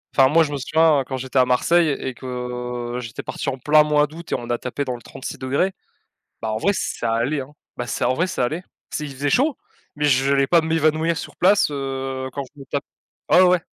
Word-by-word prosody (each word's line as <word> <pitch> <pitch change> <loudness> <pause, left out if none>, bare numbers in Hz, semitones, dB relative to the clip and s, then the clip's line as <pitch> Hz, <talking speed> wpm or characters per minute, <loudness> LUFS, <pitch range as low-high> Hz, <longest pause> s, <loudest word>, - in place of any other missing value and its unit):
Enfin 130 -1 +6
moi 165 +3 +5
je 145 -2 -3
me 145 - -1
souviens 155 +1 +3
quand 130 0 -4
j'étais 130 +1 -4
à 125 - +6
Marseille 160 +6 +3
et 130 - -4
que, 125 -1 -5
heu, - - -2
j'étais 115 -2 -7
parti - - -3
en 135 - -3
plein 150 +4 +5
mois 150 0 +3
d'août 160 +3 -11
et - - +2
on 120 - -6
a 120 - +1
tapé 130 +4 -4
dans 125 -2 -2
le 120 - -11
36°. 135 +10 -2 0.7
Bah, 110 - -2
en 110 - -1
vrai 200 - +2
ça 115 -9 -2
allait 125 +6 0
hein 135 +2 -8 0.2
bah 120 - -4
c'est - - -2
en 125 - +3
vrai 170 +7 0
ça 130 - -1
allait. 155 +8 -2 0.3
C'est 150 - -3
il 140 - -7
faisait 145 +2 -1
chaud, 275 - +2 0.4
mais 150 - -3
j'allais 135 0 +3
pas 170 - +5
m'évanouir 160 +1 +1
sur - - -7
place, 195 +3 +4
heu, 135 -1 -3
quand 140 - -3
je 145 - -18
me 135 - -10
tape 140 +1 -3 0.5
ah 185 - +7
ouais, - - +5
ouais! 180 -2 +3
140 Hz, 240 wpm, -22 LUFS, 125-155 Hz, 0.7 s, ah